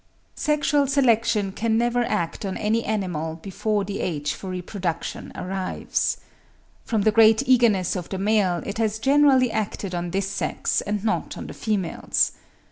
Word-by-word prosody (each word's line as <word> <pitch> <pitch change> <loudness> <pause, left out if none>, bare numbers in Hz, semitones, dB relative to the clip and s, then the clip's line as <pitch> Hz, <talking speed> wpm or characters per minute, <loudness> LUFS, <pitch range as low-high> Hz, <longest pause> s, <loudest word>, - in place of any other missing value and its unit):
Sexual 290 -2 +2
selection 230 -7 +2
can 220 +3 0
never 240 +1 +2
act 210 -7 -2
on 195 -2 -3
any 220 +2 0
animal 175 -7 -2
before 200 +4 -2
the 200 0 -5
age 145 -4 -2
for 190 - -8
reproduction 180 -2 -4
arrives. 190 0 -2 0.7
From 220 -3 0
the 215 - +4
great 220 +1 +5
eagerness 230 -9 +3
of 180 -2 -5
the 190 - -3
male 195 -3 +1
it 200 +2 -4
has 220 -1 0
generally 270 0 +4
acted 205 -3 -3
on 175 0 -2
this 195 +2 -1
sex 195 - -1
and 205 0 -3
not 225 - -1
on - - -6
the - - -8
females. 200 -6 0
210 Hz, 155 wpm, -24 LUFS, 185-230 Hz, 0.7 s, great